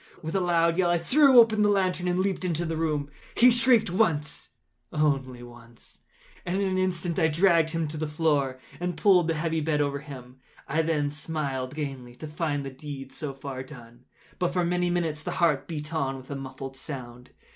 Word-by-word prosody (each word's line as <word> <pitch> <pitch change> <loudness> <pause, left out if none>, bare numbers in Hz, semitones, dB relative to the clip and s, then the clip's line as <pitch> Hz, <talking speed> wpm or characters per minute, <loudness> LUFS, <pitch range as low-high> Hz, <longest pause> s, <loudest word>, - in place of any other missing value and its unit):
With 160 +1 -4
a 195 - +1
loud 170 -1 +2
yell, 180 -2 +3
I 175 - +3
threw 265 - +6
open 220 -2 +5
the 205 - +4
lantern 185 -3 +1
and 180 0 +1
leaped 190 -1 -1
into 170 -2 -1
the 165 0 -2
room. 150 -3 -1 0.2
He 245 +1 +7
shrieked 240 -4 +4
once—once 165 -7 0 0.4
only. 135 -5 0
In 120 +9 -9
an 185 0 -1
instant 180 -2 -1
I 160 - +4
dragged 165 0 +3
him 165 -1 -2
to 155 +1 -6
the 155 0 -2
floor, 150 -4 0 0.2
and 175 -1 -3
pulled 180 -5 +4
the 165 - 0
heavy 160 +1 -1
bed 150 -1 0
over 140 -1 0
him. 130 -3 -11 0.3
I 155 +3 +1
then 150 -3 0
smiled 145 -4 -4
gaily, 135 -5 -6
to 155 +5 -8
find 150 -2 -2
the 135 - -5
deed 135 -1 -8
so 145 +1 -5
far 135 -1 -7
done. 120 -3 -13 0.3
But, 180 -1 0
for 180 -1 +1
many 180 0 0
minutes, 165 -4 -1
the - - -4
heart 150 -5 +2
beat 155 -1 -6
on 135 -4 -1
with 130 +2 -12
a - - -3
muffled 135 0 -7
sound. 125 -3 -8
155 Hz, 195 wpm, -26 LUFS, 135-175 Hz, 0.4 s, He